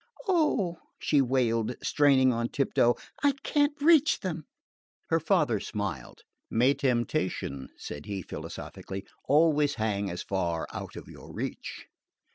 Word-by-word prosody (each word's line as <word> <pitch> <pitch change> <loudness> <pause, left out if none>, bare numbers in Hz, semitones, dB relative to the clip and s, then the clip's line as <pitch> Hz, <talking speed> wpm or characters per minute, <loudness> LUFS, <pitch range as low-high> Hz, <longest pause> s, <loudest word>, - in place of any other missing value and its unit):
"Oh," 250 - +2 0.2
she 145 - +3
wailed, 120 -3 +1
straining 135 -3 +4
on 115 +1 -1
tiptoe, 120 -3 +2 0.3
"I 285 -1 +4
can't 290 0 +1
reach 310 0 +5
them!" 165 -5 -4 0.7
Her 165 - +4
father 150 - +2
smiled. 95 - -5 0.3
"May 125 +5 +4
temptation," 120 - -1
said 75 0 -8
he 100 -3 -4
philosophically, 95 +4 -7 0.2
"always 150 0 +3
hang 100 -2 -1
as 90 0 -5
far 85 -4 -1
out - - -6
of - - -9
your - - -12
reach." - - -5
130 Hz, 125 wpm, -28 LUFS, 105-165 Hz, 0.7 s, reach